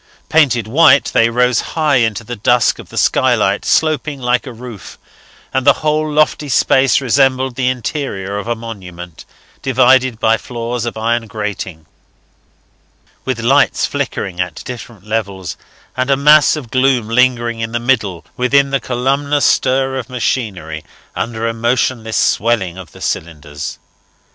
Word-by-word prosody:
Painted 130 Hz, -8 st, +3 dB
white, 145 Hz, +4 st, +4 dB
they 115 Hz, -, +4 dB
rose 125 Hz, 0 st, +2 dB
high 155 Hz, -4 st, 0 dB
into 115 Hz, -2 st, 0 dB
the 120 Hz, +2 st, -6 dB
dusk 120 Hz, +3 st, +2 dB
of -, -, -11 dB
the -, -, -10 dB
skylight, -, -, +2 dB
sloping 155 Hz, -2 st, 0 dB
like 125 Hz, +1 st, 0 dB
a -, -, -6 dB
roof; 120 Hz, -3 st, -10 dB, 0.6 s
and 130 Hz, -, +1 dB
the 140 Hz, +1 st, +6 dB
whole 155 Hz, 0 st, +1 dB
lofty 150 Hz, -1 st, +1 dB
space 130 Hz, 0 st, +3 dB
resembled 130 Hz, 0 st, +2 dB
the 125 Hz, +1 st, -1 dB
interior 120 Hz, -6 st, -3 dB
of 105 Hz, -, -7 dB
a 120 Hz, -, 0 dB
monument, 90 Hz, -7 st, -9 dB, 0.4 s
divided 130 Hz, -2 st, +3 dB
by 115 Hz, 0 st, +3 dB
floors 120 Hz, 0 st, -4 dB
of 120 Hz, -, -4 dB
iron 115 Hz, +1 st, -1 dB
grating, 100 Hz, -6 st, -5 dB, 1.4 s
with 130 Hz, -3 st, -2 dB
lights 135 Hz, +5 st, +3 dB
flickering 90 Hz, -2 st, -3 dB
at 90 Hz, -4 st, -5 dB
different 120 Hz, -5 st, -9 dB
levels, 100 Hz, -5 st, -3 dB, 0.4 s
and 130 Hz, +1 st, -1 dB
a 135 Hz, -, +3 dB
mass 150 Hz, +1 st, +5 dB
of 135 Hz, -7 st, -8 dB
gloom 130 Hz, -3 st, +2 dB
lingering 120 Hz, -1 st, +1 dB
in 115 Hz, 0 st, -3 dB
the 120 Hz, -, -1 dB
middle, 110 Hz, -8 st, -1 dB
within 135 Hz, +2 st, +2 dB
the 135 Hz, -, +1 dB
columnar 140 Hz, +4 st, 0 dB
stir 135 Hz, -1 st, +2 dB
of 125 Hz, 0 st, -8 dB
machinery 100 Hz, -11 st, -3 dB, 0.3 s
under 115 Hz, -1 st, -3 dB
the 115 Hz, -, -1 dB
motionless 115 Hz, -1 st, -1 dB
swelling 105 Hz, -6 st, +1 dB
of 95 Hz, -4 st, -11 dB
the -, -, -15 dB
cylinders. 75 Hz, -3 st, -5 dB
120 Hz, 150 wpm, -16 LUFS, 110-130 Hz, 1.4 s, the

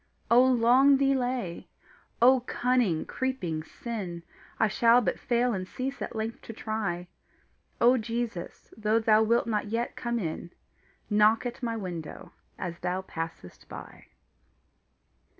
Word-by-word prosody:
Ah 235 Hz, -, +8 dB
long 255 Hz, +2 st, +5 dB
delay! 255 Hz, -9 st, -1 dB, 0.6 s
ah 260 Hz, +1 st, +7 dB
cunning, 245 Hz, -8 st, 0 dB
creeping 220 Hz, -12 st, -2 dB
sin! 185 Hz, -3 st, -6 dB, 0.4 s
I 220 Hz, -, +4 dB
shall 230 Hz, +3 st, +5 dB
but 245 Hz, -, -1 dB
fail 240 Hz, 0 st, +1 dB
and 185 Hz, -2 st, -3 dB
cease 265 Hz, +6 st, -5 dB
at -, -, -5 dB
length 220 Hz, +1 st, -4 dB
to 225 Hz, -, -9 dB
try: 205 Hz, -6 st, -3 dB, 0.7 s
O 245 Hz, +2 st, +5 dB
Jesus, 230 Hz, -5 st, -5 dB
though 215 Hz, +1 st, +1 dB
thou 220 Hz, -1 st, +4 dB
wilt 230 Hz, +2 st, +2 dB
not 215 Hz, -2 st, -1 dB
yet 230 Hz, +3 st, -2 dB
come 235 Hz, -1 st, -2 dB
in, 170 Hz, -4 st, -4 dB, 0.6 s
Knock 215 Hz, +3 st, +4 dB
at 245 Hz, +2 st, -5 dB
my 230 Hz, -2 st, -2 dB
window 175 Hz, -6 st, -7 dB, 0.3 s
as 170 Hz, -2 st, -5 dB
thou 185 Hz, +1 st, -2 dB
passest 165 Hz, -, -7 dB
by. -, -, -10 dB
225 Hz, 135 wpm, -28 LUFS, 190-245 Hz, 0.7 s, Ah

